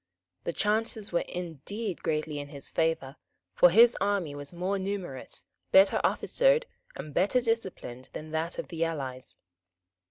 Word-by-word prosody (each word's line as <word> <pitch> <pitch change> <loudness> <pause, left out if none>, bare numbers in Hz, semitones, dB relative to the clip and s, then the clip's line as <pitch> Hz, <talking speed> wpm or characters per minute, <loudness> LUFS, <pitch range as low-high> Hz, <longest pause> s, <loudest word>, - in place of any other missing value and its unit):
The - - 0
chances 215 +2 -1
were 170 - +1
indeed 180 - -5
greatly 155 -1 -1
in 145 - -6
his 140 -1 -8
favour; 160 -4 0 0.4
for 180 - +7
his 230 +6 +7
army 200 -7 0
was 145 0 -7
more 185 +3 -1
numerous, 190 -8 -4 0.3
better 195 +1 +6
officered - - +3 0.3
and 150 - -7
better 195 - +3
disciplined 190 - -3
than 155 0 -7
that 160 +2 -2
of - - -5
the 165 -1 -1
allies. 135 -6 -4
175 Hz, 145 wpm, -29 LUFS, 150-205 Hz, 0.4 s, for